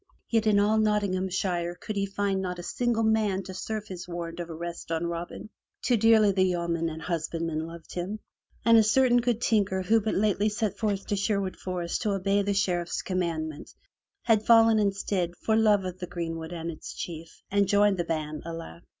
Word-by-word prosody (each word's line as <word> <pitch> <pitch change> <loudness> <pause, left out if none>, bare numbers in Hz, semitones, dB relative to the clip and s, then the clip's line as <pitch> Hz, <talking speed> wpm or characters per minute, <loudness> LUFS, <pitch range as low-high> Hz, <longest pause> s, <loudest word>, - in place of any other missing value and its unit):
Yet 225 -1 +2
in 205 -1 +5
all 215 +2 +3
Nottinghamshire 185 -4 0
could 210 +4 -6
he 200 0 0
find 195 -1 -1
not 180 -1 -3
a 175 - -7
single 235 +3 0
man 215 -3 +2
to 190 0 -8
serve 215 +3 -4
his 180 -1 -7
warrant 170 -1 -5
of 170 -1 -5
arrest 170 +1 -6
on 165 +1 0
Robin. 170 +5 -5 0.3
Too 245 - +3
dearly 220 -2 +5
the 190 -1 +1
yeomen 170 -2 0
and 160 0 -7
hus 165 -3 -2
bandmen 165 -1 -3
loved 165 -1 -11
him, 180 +4 -3 0.5
and 230 -1 +7
a - - +6
certain 245 +3 +4
good 235 -2 0
tinker 200 -5 +1
who 220 +4 +3
but 215 +1 -1
lately 210 +1 +2
set 210 0 -2
forth 205 -3 -1
to 205 - -1
Sherwood 200 -1 -1
Forest 175 -2 -3
to 210 -3 0
obey 195 +1 +1
the 200 0 -1
Sheriff's 175 -3 0
commandment, 165 -5 -3 0.5
had 220 -2 +3
fallen, 225 -1 +6
instead, 195 -3 0
for 220 - +3
love 210 -3 +4
of 185 0 -5
the 180 - -5
greenwood 165 -2 -5
and 170 -1 -4
its 155 - -9
chief, 165 -1 -7
and 200 0 +3
joined 205 0 +4
the 175 - 0
band, 155 -2 -3
alack! 165 - -7
190 Hz, 195 wpm, -27 LUFS, 170-210 Hz, 0.5 s, and